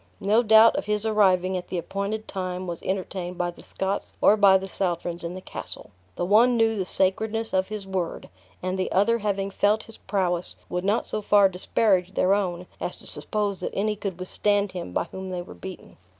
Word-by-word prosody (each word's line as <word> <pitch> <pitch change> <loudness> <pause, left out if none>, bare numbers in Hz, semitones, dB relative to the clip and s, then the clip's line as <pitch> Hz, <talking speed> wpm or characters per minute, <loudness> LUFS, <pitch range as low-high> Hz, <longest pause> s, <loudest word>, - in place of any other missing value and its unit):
No 210 +4 +3
doubt 220 0 +7
of - - -2
his 210 +1 -1
arriving 190 -4 +3
at 180 -1 -4
the 185 - -3
appointed 200 +5 -3
time 185 -1 -4
was 170 -2 -5
entertained 185 -1 -3
by 175 -1 -1
the - - -15
Scots 195 +1 -4
or 210 - +6
by 200 -2 +6
the 190 0 -6
Southrons 175 -2 -2
in 170 +1 -4
the 185 - -7
castle; - - -7 0.2
the - - -1
one 235 +6 +5
knew 225 -1 +3
the 190 -3 -2
sacredness 220 +5 +1
of 190 0 +2
his 210 -2 -5
word, 190 -3 -3 0.4
and 185 +1 -2
the 185 - -1
other 230 +5 +3
having 200 -2 -1
felt 210 +2 +2
his 225 - -13
prowess, 180 -3 -1
would 180 0 -2
not 205 +4 +1
so 215 - -3
far 205 -1 +5
disparage 190 0 +1
their 185 +1 +3
own 180 -3 -1
as - - -4
to - - -4
suppose 205 -3 -2
that - - -5
any 210 +2 0
could 195 -3 -5
withstand 205 +2 0
him 175 - -6
by - - 0
whom 190 0 -6
they 180 -1 -4
were - - -11
beaten. 190 -1 -10
195 Hz, 205 wpm, -25 LUFS, 185-210 Hz, 0.4 s, doubt